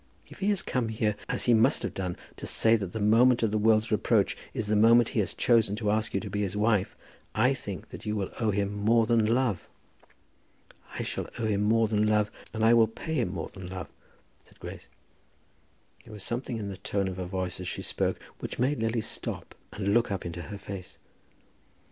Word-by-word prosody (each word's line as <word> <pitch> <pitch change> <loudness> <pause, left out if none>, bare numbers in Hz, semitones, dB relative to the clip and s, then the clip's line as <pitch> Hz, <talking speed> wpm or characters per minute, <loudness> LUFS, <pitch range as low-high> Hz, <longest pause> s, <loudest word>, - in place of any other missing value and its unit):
If - - -14
he 200 - +1
has 200 -3 +1
come 125 -3 -1
here, 110 -1 0
as 125 - 0
he 120 - +4
must 110 0 +4
have - - -3
done, 90 -2 -3 0.2
to - - -6
say 115 0 +4
that 100 -5 -3
the 110 - -4
moment 115 +4 +4
of 110 - +2
the 110 - +1
world's 110 +1 +3
reproach 105 - +2 0.2
is 110 - -3
the 105 +1 +1
moment 115 +2 +6
he - - -1
has 100 - -1
chosen 115 -4 +3
to 105 -1 0
ask 110 0 0
you - - +2
to - - -6
be 105 - -1
his 100 0 -2
wife, 105 -2 +1 0.4
I - - +4
think - - -7
that - - -9
you 105 0 -2
will 100 -3 -2
owe 110 -2 +1
him 100 0 0
more 110 +3 +3
than 115 -1 +3
love." 120 -4 +1 1.3
"I - - -2
shall - - -4
owe 115 - -2
him 105 -2 +1
more 110 +2 +3
than 105 0 +1
love, 105 -1 +2 0.2
and 110 0 -2
I 115 +1 +6
will 115 -1 +6
pay 135 +9 -6
him 120 - 0
more 85 -4 -4
than 95 -2 -9
love," 90 -2 -6 0.5
said - - -22
Grace. - - -9 1.2
There 110 - -13
was 105 -2 -5
something 120 0 -3
in 105 -2 -4
the 95 - -6
tone 100 0 -1
of 95 -1 -5
her 90 - -3
voice 90 -1 -3
as 90 - -5
she - - -4
spoke - - -1 0.2
which - - -5
made 135 +3 +1
Lily 115 0 0
stop - - -4 0.2
her - - -11
and 100 +1 +2
look 120 +1 +3
up 95 -3 -3
into 85 0 -5
her 85 +6 -7
face. 95 -2 -8
110 Hz, 225 wpm, -28 LUFS, 100-115 Hz, 1.3 s, moment